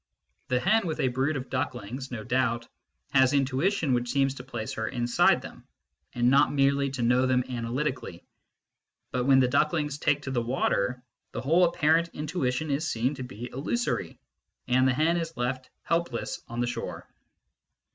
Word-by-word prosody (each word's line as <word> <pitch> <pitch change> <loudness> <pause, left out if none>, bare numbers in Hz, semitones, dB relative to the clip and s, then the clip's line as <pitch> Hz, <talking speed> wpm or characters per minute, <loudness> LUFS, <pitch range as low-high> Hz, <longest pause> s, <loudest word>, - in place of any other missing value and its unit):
The 125 -1 +1
hen 195 - +2
with 160 - -3
a 130 - +2
brood 135 +4 0
of 130 - -7
ducklings 130 -1 -3
no 115 -3 -5
doubt 120 -1 0 0.4
has 130 0 +4
intuition 140 +3 +1
which 120 0 0
seems 135 0 +2
to 125 - -9
place 120 -4 -5
her 110 0 -3
inside 120 -2 +2
them, - - -11 0.5
and 120 0 +2
not 135 - +5
merely 140 0 +2
to 130 -2 -3
know 125 +2 +3
them 125 -1 +2
analytically; 125 - -3 0.9
but 125 -1 -1
when 135 -1 +6
the 130 - +4
ducklings 150 +2 +1
take 145 -2 +1
to 130 - -4
the 120 -2 0
water, 125 -1 0 0.3
the - - -3
whole 165 +7 +4
apparent 170 -1 +2
intuition 150 -2 -2
is 150 +4 0
seen 120 +5 0
to 130 -3 -6
be 125 -1 -8
illusory, 140 - -2 0.5
and 130 +1 +3
the 130 - +3
hen 165 +4 +2
is 165 -1 -4
left 130 +1 -2
helpless 165 -8 -2
on 120 +1 -4
the - - +2
shore. 120 -1 -5
130 Hz, 170 wpm, -27 LUFS, 125-150 Hz, 0.9 s, when